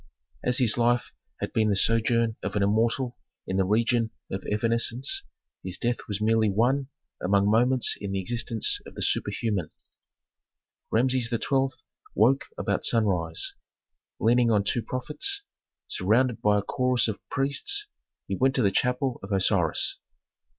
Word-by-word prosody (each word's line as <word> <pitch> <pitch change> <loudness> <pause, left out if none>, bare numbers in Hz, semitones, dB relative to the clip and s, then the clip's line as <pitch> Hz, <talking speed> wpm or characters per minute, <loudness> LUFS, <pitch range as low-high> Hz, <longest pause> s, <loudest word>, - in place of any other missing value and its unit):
As 125 0 +1
his 120 -2 +2
life 120 +1 +2 0.3
had - - -3
been 110 -1 +2
the 100 - +2
sojourn 115 +2 +2
of - - -4
an 105 - +2
immortal 115 +5 +1 0.3
in 95 - -2
the 95 - +3
region 115 +3 +1 0.2
of 95 - -4
evanescence, 115 +4 0 0.4
his 90 -1 -5
death 120 +1 -2
was 105 -1 -2
merely 110 0 +3
one 125 +7 +1 0.4
among 100 +2 +3
moments 125 +3 +2
in 100 -1 -4
the 95 - -1
existence 115 +2 0
of - - -12
the - - -2
superhuman. 105 -5 0 1.2
Rameses 125 +1 +2
XII. 135 +3 0 0.4
woke 125 +6 +3
about 100 -1 -1
sunrise; 90 -8 +1 0.7
leaning 120 +1 +3
on 105 -3 +3
two 120 +4 0
prophets, 150 - -3 0.4
surrounded 115 +6 +1
by 105 0 +3
a 100 - 0
chorus 125 +1 +1
of 110 -2 -3
priests, 140 - -1 0.4
he - - -3
went 135 +1 +2
to 125 - +2
the 100 - +3
chapel 125 +3 0
of 95 - -9
Osiris. 95 -4 +1
115 Hz, 145 wpm, -26 LUFS, 100-125 Hz, 1.2 s, the